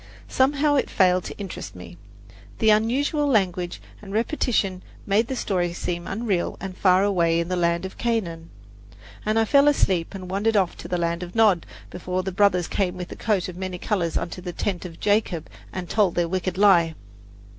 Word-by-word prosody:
Somehow 285 +3 +2
it - - 0
failed 185 -1 +3
to - - -7
interest 195 - -7
me. 90 -1 -10 0.6
The 220 -1 +4
unusual 270 +7 +2
language 185 -8 0 0.2
and 200 -2 -10
repetition 215 -4 0 0.2
made 210 +3 +2
the 265 - -3
story 180 -7 -1
seem 175 0 -4
unreal 195 -4 -1
and 190 -1 -6
far 185 0 +4
away 170 -4 +2
in 170 +1 -2
the 185 - 0
land 170 0 +1
of 190 - -9
Canaan, 175 -9 -2 0.8
and 215 +1 +2
I 225 - +4
fell 280 +5 +5
asleep 190 - +1
and 185 -1 -7
wandered 205 +4 +1
off 185 -3 +1
to - - -8
the 180 - -1
land 170 0 -1
of 180 +2 -7
Nod, 210 -7 +3 0.2
before 180 +1 -3
the 190 - -3
brothers 180 -2 +2
came 185 -2 -1
with 180 0 -6
the - - -7
coat 205 -5 0
of 180 - -8
many 185 0 -4
colours 175 -3 -1
unto 180 +1 -4
the 175 -1 -6
tent 185 -1 -3
of 165 -2 -9
Jacob 205 -6 0 0.2
and 180 -1 -5
told 200 -4 +2
their 175 -1 +1
wicked 185 +1 -2
lie! 175 -5 +5
185 Hz, 190 wpm, -24 LUFS, 175-215 Hz, 0.8 s, fell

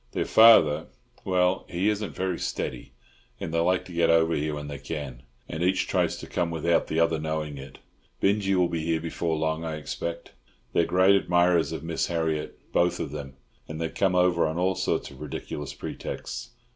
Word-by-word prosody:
Their - - -1
father—well, 90 -2 +4
he 90 +4 0
isn't 105 -1 -1
very 95 -2 -2
steady; - - -4 0.5
and 80 - -5
they 85 - +2
like 90 +2 +1
to 90 - -11
get 85 0 +2
over 80 0 +4
here 75 0 -1
when 75 0 -6
they 70 -1 -6
can, 70 -4 -6 0.3
and 80 - -5
each 90 +2 +2
tries - - +1
to - - -8
come 85 - -1
without 85 +1 +1
the 80 - -1
other 85 -1 +2
knowing 75 -2 -3
it. 70 - -10 0.4
Binjie 100 -1 +2
will 90 -1 +3
be 85 -2 -3
here 80 0 0
before 80 0 -2
long, 80 +1 -1
I 80 -1 -3
expect. 85 +2 -5 0.4
They're 85 - +3
great 95 +3 +4
admirers 90 -4 +3
of 80 - -5
Miss 80 0 -1
Harriott, 80 -3 -2 0.2
both 90 0 +2
of 70 - -4
them, 70 -3 -7 0.3
and 80 0 -6
they 80 -1 -1
come 95 +1 +1
over 90 -2 +3
on 80 +1 -3
all 95 +2 +2
sorts - - -1
of - - -14
ridiculous 75 -2 -6
pretexts. - - -6
85 Hz, 190 wpm, -26 LUFS, 80-90 Hz, 0.5 s, father—well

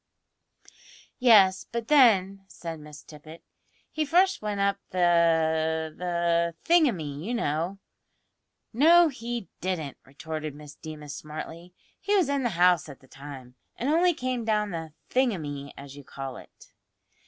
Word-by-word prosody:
"Yes; 200 -7 +5
but 230 0 -4
then," 195 -9 +4
said 165 -4 -8
Miss 150 0 -12
Tippet, 155 +2 -13 0.5
"he 310 - -1
first 365 +6 +2
went 210 -1 -3
up 200 0 +1
the 160 -2 +2
the 170 -1 0
thingumy, 185 - +2
you 235 +6 -3
know." 170 -1 -2 1.0
"No, 330 +7 +6
he 235 -4 -5
didn't," 165 -7 -3
retorted 155 +2 -6
Miss 150 -1 -12
Deemas 150 -2 -9
smartly; 165 +3 -9 0.2
"he 410 +1 0
was 360 -8 +2
in 280 -1 0
the 245 - 0
house 175 -2 +3
at 140 - -11
the 130 - -21
time, 135 -2 -11 0.2
and 255 - -2
only 345 +2 +3
came 255 -3 -3
down 210 -2 0
the 160 -2 -6 0.2
`thingumy,' 155 - -1
as 140 0 -10
you 145 - -11
call 135 -1 -7
it!" - - -17
175 Hz, 140 wpm, -27 LUFS, 155-235 Hz, 1.0 s, No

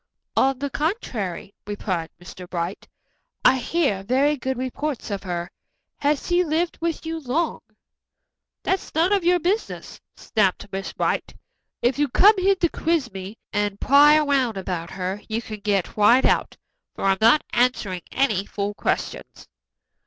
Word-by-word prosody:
"On 270 0 +3
the 280 +1 -4
contrary," 245 - -3
replied 185 -5 -3
Mr. 175 0 -11
Bright, 175 +2 -4 0.6
"I 265 - +6
hear 265 - 0
very 270 +8 +2
good 260 -1 -3
reports 260 0 -4
of 200 - -3
her. 175 -2 -4 0.5
Has 290 0 +1
she 355 0 +2
lived 330 +1 -1
with 330 -1 -2
you 325 0 -3
long?" 310 +4 -1 1.0
"That's 380 -4 -2
none 340 +5 +3
of 395 -3 +2
your 355 +1 +4
business," 370 +6 -3
snapped 200 -3 0
Miss 195 0 -4
Brant. - - -2 0.5
"If 245 +3 +2
you've 290 -4 0
come 415 +3 +7
here 390 +1 +3
to 350 -2 +1
quiz 310 - -1
me 190 +3 -7 0.2
and 205 -1 -1
pry 290 +2 +6
around 275 -7 +1
about 180 -3 -4
her, 190 +2 -4
you 220 +1 -1
can 215 -2 -8
get 200 -3 -1
right 235 +5 +5
out, - - +1 0.4
for - - -6
I'm 195 -1 +2
not 230 +7 +5
answering 240 -7 +1
any 220 -8 +1
fool 205 0 -3
questions." - - -3
250 Hz, 155 wpm, -23 LUFS, 195-305 Hz, 1.0 s, come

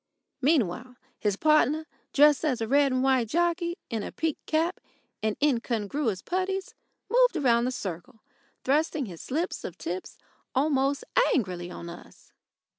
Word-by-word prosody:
Meanwhile, 250 - +1 0.2
his 205 -2 +1
partner, 305 +3 +3 0.3
dressed 295 +1 +5
as 265 -6 +1
a 225 - -2
red 280 +2 +4
and 255 0 +1
white 260 -3 +3
jockey, 345 - 0
in 225 -2 -1
a - - -5
peaked 320 -2 -3
cap 325 +3 +1 0.4
and 215 -1 -1
incongruous 235 -5 0
puttees, 375 +1 -2 0.3
moved - - +4
round 245 -6 +3
the - - -1
circle 215 +2 -6 0.4
thrusting 295 +1 +1
his 175 -6 -9
slips 320 +6 -2
of 175 - -6
tips 180 +2 -5 0.4
almost 275 0 +2 0.3
angrily 180 -7 -2
on 170 -1 -8
us. 170 +1 -13
265 Hz, 140 wpm, -27 LUFS, 220-310 Hz, 0.4 s, dressed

